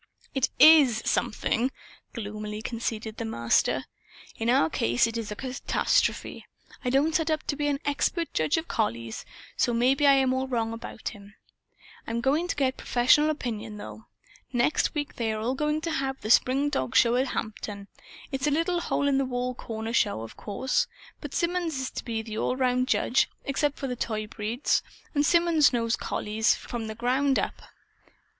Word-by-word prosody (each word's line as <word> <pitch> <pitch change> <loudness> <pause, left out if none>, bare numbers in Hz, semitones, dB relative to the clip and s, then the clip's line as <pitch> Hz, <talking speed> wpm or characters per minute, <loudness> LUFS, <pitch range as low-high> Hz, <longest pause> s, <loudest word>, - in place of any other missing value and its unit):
"It 270 -2 +1
IS 285 -8 +7
'something,'" 230 +3 0 0.4
gloomily 210 -1 -5
conceded 225 -1 -4
the - - -3
Master. 115 - +1 0.5
"In 225 +1 -1
our 240 -10 +4
case 120 - +2
it 230 0 -4
is 225 -2 -4
a - - -3
catastrophe. 260 +3 -1 0.4
I 250 - 0
don't 280 +5 +2
set 320 0 +1
up 310 -1 0
to 285 - -1
be 295 0 -1
an 285 -1 0
expert 320 +4 -1
judge 155 - +1
of 325 +1 -3
collies, 115 - -2 0.3
so 240 - +1
maybe 265 +5 +3
I 280 - +8
am 265 -1 +3
all 260 0 -1
wrong 230 -3 -1
about 225 -1 -6
him. 205 -2 -14 0.7
I'm 230 +1 -1
going 285 +8 +1
to - - -2
get 265 -2 0
professional 255 +5 +3
opinion, 225 -7 -4
though. 220 +1 -10 0.4
Next 245 +6 +1
week 290 -1 -3
they 225 -2 0
are 220 +4 -1
going 300 +2 -1
to 330 - -2
have 270 -3 -2
the 215 - -1
spring 275 +5 +4
dogshow 230 - +3
at 265 - -2
Hampton. 210 -2 -5 0.4
It's 270 +1 -1
a - - +2
little 335 +4 +1
hole 285 - 0
in 275 -1 +3
a 250 -1 -2
corner 225 -2 -5
show, 205 - +1
of 115 - -9
course. 255 +6 -1 0.3
But - - -7
Symonds 340 -4 0
is 260 - -3
to - - -6
be 225 -2 -3
the 220 -1 -5
all - - 0
around 255 -1 +1
judge, 255 - +2 0.2
except 285 +1 0
for 275 - -4
the 250 -2 -2
toy 215 -2 -2
breeds. 220 +4 -1 0.3
And 290 -2 +2
Symonds 335 -1 +4
knows 230 -2 +1
collies, 215 +1 0
from 230 -2 -6
the 220 - -6
ground 260 +4 +1
up. - - -2
250 Hz, 180 wpm, -27 LUFS, 220-285 Hz, 0.7 s, I